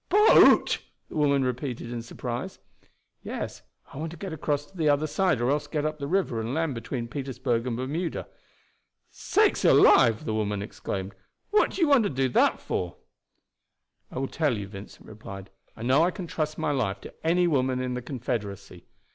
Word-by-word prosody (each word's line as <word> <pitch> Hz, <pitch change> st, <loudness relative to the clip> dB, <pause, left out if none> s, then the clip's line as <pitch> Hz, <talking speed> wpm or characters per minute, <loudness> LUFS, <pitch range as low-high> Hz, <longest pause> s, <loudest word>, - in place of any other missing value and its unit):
"Boat!" 420 Hz, +4 st, +6 dB, 0.3 s
the -, -, -10 dB
women 140 Hz, -3 st, +3 dB
repeated 125 Hz, -1 st, -3 dB
in 120 Hz, -1 st, -4 dB
surprise. 120 Hz, +1 st, -5 dB, 0.6 s
"Yes, -, -, -5 dB, 0.3 s
I -, -, -9 dB
want 160 Hz, +2 st, -3 dB
to 170 Hz, -, -10 dB
get 185 Hz, +1 st, -6 dB
across 145 Hz, -2 st, -1 dB
to 190 Hz, -, -24 dB
the 160 Hz, -4 st, +1 dB
other 145 Hz, +1 st, +2 dB
side, 180 Hz, -, +1 dB
or 120 Hz, +3 st, +1 dB
else 145 Hz, 0 st, 0 dB
to -, -, -17 dB
get 150 Hz, -2 st, -1 dB
up 155 Hz, 0 st, -2 dB
the 140 Hz, -, -3 dB
river 160 Hz, -10 st, 0 dB
and 115 Hz, +4 st, -3 dB
land 160 Hz, -3 st, 0 dB
between 115 Hz, 0 st, -4 dB
Petersburg 130 Hz, -2 st, -2 dB
and 115 Hz, -2 st, -2 dB
Bermuda." 155 Hz, +7 st, -3 dB, 0.8 s
"Sakes 425 Hz, -1 st, +1 dB
alive!" 115 Hz, -4 st, +6 dB
the 110 Hz, -, -1 dB
woman 105 Hz, -2 st, -1 dB
exclaimed; 95 Hz, -2 st, -5 dB, 0.4 s
"what 425 Hz, -, +4 dB
do -, -, -4 dB
you 330 Hz, -, +5 dB
want 280 Hz, -5 st, +5 dB
to -, -, +1 dB
do 135 Hz, -1 st, 0 dB
that -, -, +3 dB
for?" 90 Hz, -2 st, -3 dB, 1.1 s
"I -, -, -9 dB
will 135 Hz, +1 st, -1 dB
tell 145 Hz, -7 st, 0 dB
you," 100 Hz, -1 st, -5 dB
Vincent 100 Hz, 0 st, -11 dB
replied. 100 Hz, -2 st, -10 dB, 0.3 s
"I 115 Hz, -, -7 dB
know 130 Hz, +5 st, +4 dB
I 170 Hz, -, +4 dB
can 185 Hz, -1 st, -6 dB
trust 155 Hz, -2 st, -3 dB
my 150 Hz, -, 0 dB
life 105 Hz, -9 st, -1 dB
to -, -, -10 dB
any 175 Hz, +2 st, +3 dB
woman 130 Hz, -5 st, +1 dB
in 125 Hz, 0 st, -2 dB
the 125 Hz, -, -3 dB
Confederacy. 105 Hz, -8 st, -5 dB
130 Hz, 190 wpm, -27 LUFS, 115-155 Hz, 1.1 s, Boat